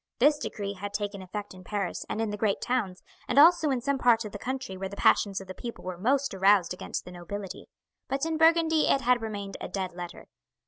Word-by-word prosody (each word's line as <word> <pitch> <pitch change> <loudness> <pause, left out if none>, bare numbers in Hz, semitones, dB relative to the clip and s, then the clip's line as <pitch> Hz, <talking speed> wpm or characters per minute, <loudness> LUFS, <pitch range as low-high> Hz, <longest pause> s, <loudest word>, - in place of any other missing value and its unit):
This 295 +4 +4
decree 200 -6 -4
had 200 +1 -6
taken 205 -1 -3
effect 205 +2 -6
in 185 0 -13
Paris 195 -2 -3
and 215 - -3
in 225 -2 -1
the - - -2
great 210 -1 0
towns, 220 -8 -2 0.2
and 250 - -1
also 320 +1 +7
in 260 -3 0
some 280 +2 0
parts 230 -3 +4
of 210 - -6
the 205 - -7
country 260 -3 -4
where 190 +1 -4
the 200 - -8
passions 200 -1 +3
of 195 - -9
the 185 - -6
people 235 +5 -8
were 185 -1 -4
most 270 +5 +1
aroused 195 -2 +4
against 180 - -5
the 180 - -9
nobility; 185 +2 -7 0.4
but 275 +2 -1
in 325 -1 -1
Burgundy 320 0 +4
it 275 - +3
had 250 -1 +3
remained 205 -3 -5
a - - -4
dead 190 -2 -3
letter. 175 -1 -8
210 Hz, 230 wpm, -28 LUFS, 195-260 Hz, 0.4 s, also